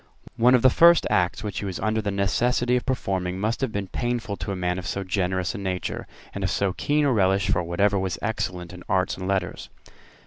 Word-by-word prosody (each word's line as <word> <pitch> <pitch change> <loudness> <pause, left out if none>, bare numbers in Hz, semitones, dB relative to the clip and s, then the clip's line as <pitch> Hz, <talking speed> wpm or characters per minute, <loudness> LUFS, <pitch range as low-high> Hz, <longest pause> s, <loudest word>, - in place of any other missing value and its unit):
One 125 +2 +5
of 125 - +2
the 130 - +7
first 170 +3 +6
acts 90 -1 +1
which 105 -2 -3
he - - -4
was 95 -3 -4
under 110 +1 0
the 105 - -2
necessity 120 +5 +1
of 125 - -2
performing 95 -8 -2
must 110 +3 -1
have 130 -4 0
been 100 -2 -3
painful 120 +1 -3
to - - -4
a - - -2
man 90 0 -1
of 90 - -7
so 100 - -2
generous 90 -1 -1
a - - -6
nature, 95 -2 -3 0.3
and - - -4
of - - +1
so 100 -2 0
keen 150 +7 +1
a 140 - +3
relish 95 -2 +2
for 90 - +1
whatever 100 +4 +1
was 95 -2 -2
excellent 90 -6 -3
in 90 - -10
arts 95 0 +1
and 95 0 -6
letters. 95 -3 -2
100 Hz, 230 wpm, -24 LUFS, 95-115 Hz, 0.3 s, the